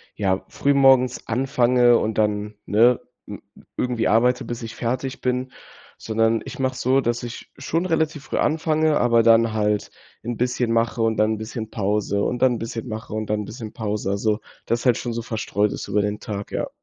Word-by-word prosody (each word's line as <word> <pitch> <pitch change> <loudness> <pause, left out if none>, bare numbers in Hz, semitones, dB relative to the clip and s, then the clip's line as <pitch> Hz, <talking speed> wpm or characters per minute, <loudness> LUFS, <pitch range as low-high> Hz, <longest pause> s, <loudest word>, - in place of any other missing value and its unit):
ja, 95 -2 0
früh 140 0 +1
morgens 130 -2 +4
anfange 125 -1 +3
und 110 0 -2
dann 105 0 0
ne, 115 +4 +4 0.3
m - - -8 0.2
m - - -16
irgendwie 125 -2 0
arbeite, 125 +3 +3
bis 120 0 -5
ich 115 - -6
fertig 130 +3 -3
bin, 125 0 -1 0.5
sondern 115 0 +1
ich - - -8
mache 130 -1 0
es - - -7
so, 130 +2 +3
dass 120 -1 -1
ich 120 0 -8
schon 165 +5 -1
relativ 160 -4 0
früh - - -4
anfange, 155 0 +2
aber 115 -1 +4
dann 115 0 +5
halt 105 -1 0 0.3
'n 120 0 -4
bisschen 125 -1 0
mache 115 0 +1
und 115 -1 +1
dann 110 +1 +3
'n - - -3
bisschen 110 0 -6
Pause 100 -1 -1
und 120 - -2
dann 130 -1 +4
'n - - -3
bisschen 115 +1 -5
mache 110 -1 -6
und 110 0 -3
dann 105 0 0
'n 105 - -6
bisschen 110 0 -8
Pause. 105 -3 -2
Also, 105 +2 0 0.3
das 115 +2 -1
halt 125 -3 +5
schon 120 - -4
so 115 0 -3
verstreut 105 -2 -1
ist - - -6
über 105 +1 +2
den 105 +1 -2
Tag, 100 -1 -6
ja. - - -2
115 Hz, 205 wpm, -23 LUFS, 110-125 Hz, 0.5 s, dann